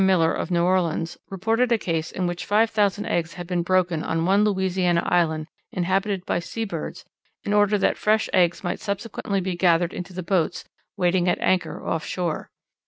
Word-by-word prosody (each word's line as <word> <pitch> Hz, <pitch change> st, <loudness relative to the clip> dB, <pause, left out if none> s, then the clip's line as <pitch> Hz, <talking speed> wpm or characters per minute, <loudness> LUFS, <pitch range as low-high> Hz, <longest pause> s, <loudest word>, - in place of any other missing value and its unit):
Miller, 180 Hz, -4 st, +3 dB
of -, -, -3 dB
New 170 Hz, -1 st, +2 dB
Orleans, 175 Hz, -2 st, 0 dB
reported 225 Hz, +6 st, 0 dB
a 235 Hz, -, +5 dB
case 165 Hz, -5 st, -2 dB
in 185 Hz, -, -2 dB
which 175 Hz, 0 st, -3 dB
five 220 Hz, +2 st, +3 dB
thousand 205 Hz, -1 st, +1 dB
eggs 165 Hz, -1 st, -1 dB
had 175 Hz, -1 st, -6 dB
been 175 Hz, 0 st, -1 dB
broken 180 Hz, -2 st, +1 dB
on 165 Hz, 0 st, -1 dB
one 195 Hz, +3 st, +4 dB
Louisiana 185 Hz, -4 st, +1 dB
island 160 Hz, -3 st, +1 dB, 0.3 s
inhabited 190 Hz, +1 st, -1 dB
by -, -, 0 dB
sea 225 Hz, +6 st, -4 dB
birds 200 Hz, -, -6 dB, 0.4 s
in 205 Hz, -, -1 dB
order 205 Hz, 0 st, +4 dB
that 195 Hz, -, +1 dB
fresh 215 Hz, +1 st, +2 dB
eggs 175 Hz, -1 st, +3 dB
might 175 Hz, -, -2 dB
subsequently 200 Hz, 0 st, -3 dB
be 185 Hz, -1 st, -2 dB
gathered 175 Hz, -1 st, +2 dB
into 180 Hz, +1 st, -6 dB
the 185 Hz, 0 st, -5 dB
boats 170 Hz, -2 st, 0 dB, 0.3 s
waiting 180 Hz, -1 st, +2 dB
at -, -, +2 dB
anchor 180 Hz, -4 st, 0 dB
off 160 Hz, -, -1 dB
shore. 175 Hz, -4 st, -3 dB
185 Hz, 185 wpm, -24 LUFS, 170-200 Hz, 0.4 s, a